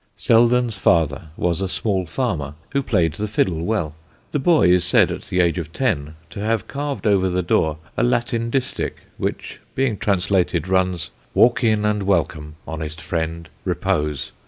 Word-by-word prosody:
Selden's 120 0 +3
father 80 -5 +2
was 90 +1 0
a 95 - 0
small 95 -3 -1
farmer 80 - -2 0.2
who 140 - +1
played 90 - +1
the 105 - -3
fiddle 90 -6 0
well. 85 -7 -1 0.4
The 145 - 0
boy 155 - +4
is 90 -1 +4
said 90 - +4
at - - -4
the 90 - -1
age 85 +1 +1
of 80 -2 -6
ten 80 - -1 0.2
to - - -7
have 110 -1 -1
carved 140 -2 -4
over 95 -3 +3
the 90 0 0
door 80 -2 +1 0.2
a - - 0
Latin 115 - 0
distich, 130 +1 -2 0.2
which, - - -4 0.2
being 130 -6 0
translated, 95 -2 +1
runs: 95 -3 0 0.2
Walk 120 +1 +4
in 110 -2 +2
and 105 -1 +1
welcome, 80 -5 -1
honest 80 0 -5
friend; 80 0 -3 0.2
repose. 75 -7 -1
95 Hz, 165 wpm, -21 LUFS, 80-115 Hz, 0.4 s, boy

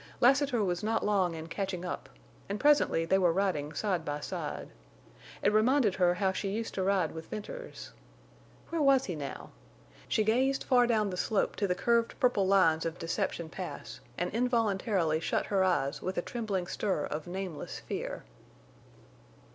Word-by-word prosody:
Lassiter 270 -2 +4
was 175 -2 -1
not 225 +1 0
long 190 -5 +2
in 160 0 -6
catching 185 +1 -4
up, 180 - -5 0.4
and 200 +1 -2
presently 290 - +4
they 190 +3 +3
were 180 -3 +4
riding 165 -5 0
side 185 0 -1
by 145 -2 -3
side. - - -5 0.7
It 205 - +3
reminded 225 0 +4
her 180 -1 +3
how 190 +1 +1
she 195 +1 -3
used 225 +3 -3
to 190 - -2
ride 190 -4 +2
with 160 0 -8
Venters. - - -7 0.8
Where 335 -2 -1
was 275 -2 +5
he 180 - -4
now? 145 -2 -6 0.6
She 215 - +2
gazed 260 +5 +2
far 245 -2 +4
down 215 -4 +1
the 180 - -4
slope 205 +2 0
to 200 - +1
the 180 - +1
curved 235 +4 +1
purple 225 -6 +3
lines 175 -5 +4
of 165 0 -3
Deception 170 0 -2
Pass 180 +2 -7 0.2
and 180 - -1
involuntarily 210 -8 +1
shut - - -1
her 195 -2 +2
eyes 170 -7 +1
with 185 +1 -3
a 175 - 0
trembling 210 -6 -2
stir 185 -3 -1
of 150 +2 -5
nameless 185 -3 -5
fear. - - -5
195 Hz, 170 wpm, -30 LUFS, 175-225 Hz, 0.8 s, was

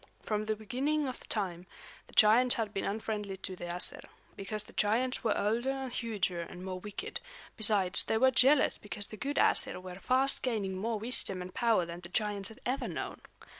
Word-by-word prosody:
From 215 -1 -1
the 215 - 0
beginning 275 +8 -1
of 255 - -8
time, 185 -4 -2 0.4
the - - -19
giants 235 +4 +6
had 215 -3 -3
been 195 - -2
unfriendly 210 -1 -3
to 190 0 -6
the 175 - -7
Æsir, 175 +1 -2 0.3
because 210 +2 -4
the - - -15
giants 240 +5 0
were 220 - +1
older 230 +5 0
and 265 -2 -3
huger 200 -8 -2
and 180 +2 -8
more 185 -1 -4
wicked; 205 +2 -6 0.4
besides, 210 -4 +4
they 220 - 0
were 260 +3 +5
jealous 270 +3 +4
because 205 0 -4
the - - -8
good 275 +6 -4
Æsir - - +5
were 185 0 -9
fast 260 +4 +1
gaining 210 -7 -2
more 220 +4 -2
wisdom 215 -4 0
and 180 0 -7
power 225 -7 +2
than 170 +1 -7
the 175 -1 -10
giants 205 0 0
had 220 - -14
ever 255 +3 -1
known. - - -5
215 Hz, 195 wpm, -31 LUFS, 190-245 Hz, 0.4 s, giants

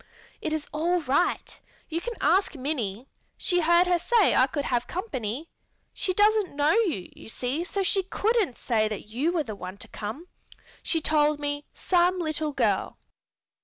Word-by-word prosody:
It 315 - -2
is 310 -1 -2
all 340 +4 +1
right. 295 +5 0 0.3
You 330 +1 -3
can 480 +3 -4
ask 345 +3 +3
Minnie; 255 -5 -3 0.3
she 355 -2 +1
heard 345 +2 +5
her 355 -1 +2
say 455 +3 +3
I 255 - +5
could 285 +1 -3
have 245 -1 0
company. 290 - -4 0.4
She 370 - -1
doesn't 415 -3 +3
know 290 +2 +3
you, 370 - +1
you - - -11
see, 255 +8 -2
so 390 +2 -2
she 385 +1 +2
couldn't 405 - 0
say 220 -3 +1
that 210 0 -6
you 265 +10 0
were 340 -3 0
the 220 -6 -6
one 185 -1 -8
to - - -11
come. 220 +11 -6 0.6
She 325 - 0
told 300 -1 +2
me 290 0 -3
'some 360 0 +2
little 310 -3 -2
girl.'" - - 0
310 Hz, 170 wpm, -26 LUFS, 255-360 Hz, 0.6 s, heard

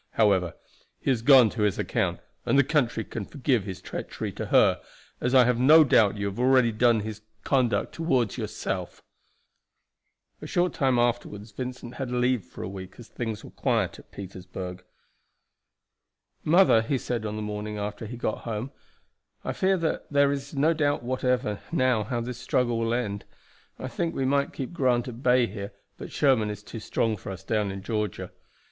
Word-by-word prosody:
However, 95 -5 +2 0.4
he - - 0
has 120 -4 0
gone 125 -3 +7
to 110 - -4
his 105 -3 +2
account, - - -1 0.2
and - - +2
the 140 - +6
country 130 -6 +1
can 110 - -6
forgive 125 -2 0
his 95 -2 -7
treachery - - -5
to - - -5
her, - - +4 0.4
as 125 +2 0
I 130 - +8
have 125 -1 +1
no 155 +5 +8
doubt 110 -7 +4
you 100 - -2
have 100 +2 -4
already 130 -2 +4
done 115 0 +3
his 110 0 -6 0.2
conduct 130 -4 +1
toward 130 - 0
yourself." 95 -5 -4 1.4
A - - -6
short 175 -1 +1
time 130 -3 +2
afterward 120 -3 -1
Vincent 125 -1 -6
had 135 -3 -3
leave 125 -2 +1
for - - -9
a - - -4
week, 95 -1 -8
as 120 - -12
things 115 -3 -5
were - - -11
quiet - - 0
at - - -18
Petersburg. 90 -1 -8 1.6
"Mother," 170 -8 +5
he 130 +5 -1
said 120 -2 -3
on 105 -1 -3
the 110 - -4
morning 105 0 -4
after 105 +2 -4
he 120 +2 -7
got 110 - -2
home, 115 +3 -4 0.7
"I - - -1
fear 190 0 +2
that 165 -3 -2
there 140 -1 +4
is 140 +1 -5
no 150 +4 +3
doubt 145 -4 0
whatever 125 -3 0
now 130 -9 +2
how 120 -2 -2
this 120 +1 -5
struggle 120 -1 0
will 115 +1 0
end. 105 -5 -3 0.5
I 130 - -5
think 165 +7 -2
we 135 - 0
might 140 +1 +1
keep 135 +4 -6
Grant 125 -6 +1
at 120 -1 -8
bay 125 -1 +4
here, 100 -1 -7 0.3
but - - -8
Sherman 130 -7 +2
is 105 0 -6
too 115 - -8
strong 110 0 -1
for 95 - -7
us 95 - -8
down 105 -3 0
in 95 0 -7
Georgia. 105 -1 -3
120 Hz, 185 wpm, -26 LUFS, 105-130 Hz, 1.6 s, I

